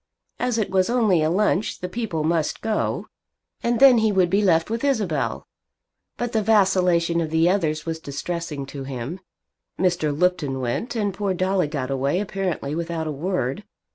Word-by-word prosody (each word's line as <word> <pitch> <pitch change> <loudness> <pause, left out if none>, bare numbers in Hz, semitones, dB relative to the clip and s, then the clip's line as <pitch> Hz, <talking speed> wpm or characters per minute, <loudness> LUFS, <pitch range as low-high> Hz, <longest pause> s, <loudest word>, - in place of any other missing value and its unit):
As 250 -2 0
it 215 - -1
was 190 +1 +2
only 220 -9 +3
a 155 - +2
lunch 200 +2 +1
the 180 - -4
people 185 -6 -3
must 160 -1 0
go, 220 -1 -1 0.6
and 235 -1 0
then 265 -3 +8
he 220 -1 +2
would 185 -3 +2
be 200 +2 +3
left 170 -1 +2
with 230 +2 -2
Isabel. 220 - 0 0.7
But 240 -1 -2
the 220 - +1
vacillation 180 -5 +3
of 160 - -2
the 160 +1 +3
others 160 -5 0
was 165 -1 -3
distressing 150 0 -4
to 135 0 -7
him. 135 +6 -5 0.6
Mr. 175 -4 +1
Lupton 150 -4 0
went, 130 - -2
and 205 -3 0
poor 195 -1 -1
Dolly 185 -2 +1
got 140 -3 -3
away 140 +6 0
apparently 190 -7 -3
without 165 0 -3
a 155 - -2
word. 160 +1 -2
180 Hz, 170 wpm, -23 LUFS, 155-205 Hz, 0.7 s, then